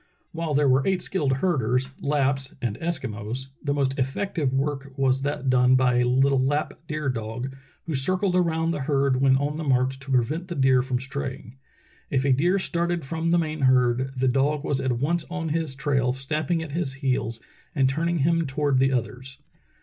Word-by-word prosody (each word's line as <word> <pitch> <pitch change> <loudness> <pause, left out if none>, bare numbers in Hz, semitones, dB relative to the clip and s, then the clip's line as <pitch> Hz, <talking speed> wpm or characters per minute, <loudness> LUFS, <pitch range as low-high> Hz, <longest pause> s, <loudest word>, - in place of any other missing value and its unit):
While 165 -3 -2
there 145 0 +3
were 135 +1 +3
eight 190 -2 +1
skilled 145 -8 0
herders, 130 -4 0
Lapps 135 -2 0
and 115 -4 -2
Eskimos, 130 -6 -4
the 145 - -1
most 135 -1 0
effective 140 +2 -1
work 135 0 -2
was 135 -1 +2
that 140 -1 -3
done 125 0 +4
by 125 -1 +3
a 125 - +3
little 135 +2 +3
Lapp 145 +3 0
deer 150 -1 -3
dog, 120 +1 -3 0.3
who 165 - -3
circled 185 +7 +1
around 165 -2 +1
the 160 - -2
herd 135 -2 +1
when 135 -1 +5
on 145 +2 -2
the 160 - -4
march 130 -1 +1
to 135 +1 -12
prevent 135 +7 0
the 175 - -5
deer 130 -2 +4
from 125 -1 -2
straying. 135 -2 -6 0.5
If 135 -1 0
a 140 - +3
deer 175 +9 +2
started 170 -3 -1
from 165 +4 -2
the 170 - +4
main 155 -2 -2
herd 130 -1 +3
the 130 +1 +1
dog 140 +3 +1
was 140 -3 -1
at 130 -2 0
once 160 +6 0
on 170 -2 -3
his 160 -3 -2
trail, 135 -3 +1
snapping 155 +5 -1
at 155 - -8
his 155 -3 -2
heels 130 -4 -2 0.4
and 135 -3 +3
turning 165 +5 0
him 165 -1 +2
toward 140 -1 +1
the 135 +1 +3
others. 125 +2 -3
135 Hz, 190 wpm, -25 LUFS, 130-155 Hz, 0.5 s, when